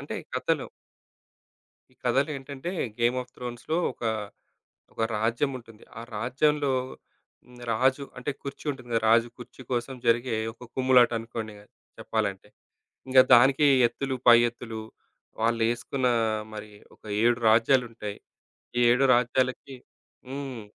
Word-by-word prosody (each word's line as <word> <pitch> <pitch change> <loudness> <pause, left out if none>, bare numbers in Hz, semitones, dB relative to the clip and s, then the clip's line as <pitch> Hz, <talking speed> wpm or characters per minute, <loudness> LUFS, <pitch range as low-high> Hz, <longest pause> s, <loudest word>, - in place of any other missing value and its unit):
అంటే - - -6 0.2
కతలో - - 0 1.3
ఈ - - -27
కథలేంటంటే 140 +2 -1 0.3
'game 120 +2 +2
of 125 0 -20
త్రోన్స్‌లో' 125 +7 -4
ఒక - - -19 0.9
ఒక 115 - -4 0.2
రాజ్యం 120 +6 0
ఉంటుంది. 115 -2 -17 0.2
ఆ - - -6 0.2
రాజ్యంలో 140 +5 +1 0.7
హ్మ్, 125 0 -16
రాజు 130 +5 +2 0.2
అంటే 125 +4 -3
కుర్చీ 140 +2 -8
ఉంటుంది 130 -3 -8
గదా! 115 - +2
రాజు 115 +1 +4
కుర్చీ 125 +1 -12
కోసం 120 +2 -2
జరిగే 120 0 +2 0.2
ఒక 125 +1 -13
కుమ్ములాటనుకోండిగ 115 -4 +1 0.4
చెప్పాలంటే. - - -3 0.6
ఇంగా 130 0 +7
దానికి 135 +4 +5 0.2
ఎత్తులు, 135 +2 -3
పై 120 - +10
ఎత్తులు. 115 -2 -8 0.6
వాళ్ళేసుకున్న 115 +3 0 0.5
మరి 105 0 -8 0.2
ఒక - - -29 0.2
7 120 0 +3
రాజ్యాలుంటాయి. 115 -2 +1 0.7
7 125 +3 +4
రాజ్యాలకి 130 +2 0 0.5
హ్మ్. 135 -5 -6
125 Hz, 115 wpm, -26 LUFS, 115-130 Hz, 1.3 s, పై